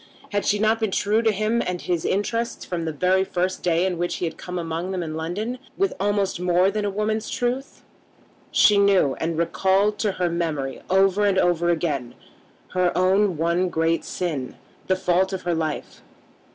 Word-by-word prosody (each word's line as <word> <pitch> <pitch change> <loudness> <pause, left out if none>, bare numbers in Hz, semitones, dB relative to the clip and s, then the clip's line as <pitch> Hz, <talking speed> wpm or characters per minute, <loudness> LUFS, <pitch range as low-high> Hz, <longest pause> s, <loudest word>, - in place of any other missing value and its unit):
Had 205 -1 -1
she 210 - +3
not 220 +2 +2
been 220 -2 0
true 210 +3 +1
to 225 -1 +3
him 215 +3 0
and 180 -1 -3
to - - -11
his 175 -3 -1
interests 230 +4 -1
from 170 -2 -3
the 160 - -1
very 185 +5 +2
first 185 0 -2
day 175 0 +2
in 180 -3 -2
which 175 0 -1
he - - -2
had 165 - -4
come 180 0 -6
among 165 +1 -3
them 185 -2 -2
in 155 -1 -5
London, 195 +10 -3 0.2
with 390 0 +1
almost 200 -2 0
more 180 +2 +3
than 210 +1 -2
a 205 - 0
woman's 215 +2 -2
truth? 250 +3 -3 0.7
She 205 -1 +5
knew 195 -9 +4
and 165 0 -2
recalled 190 +5 +1
to 210 -3 0
her 180 -1 0
memory 160 -6 -2
over 195 +2 +3
and 195 -1 +2
over 175 -2 +2
again 150 -7 -1 0.5
her 180 -1 +1
own 185 0 +3
one 170 +3 +1
great 165 0 0
sin, 155 -8 -4 0.3
the 185 - +3
fault 185 +1 +1
of 185 - -4
her 175 - 0
life. 160 -2 -3
185 Hz, 190 wpm, -23 LUFS, 170-205 Hz, 0.7 s, She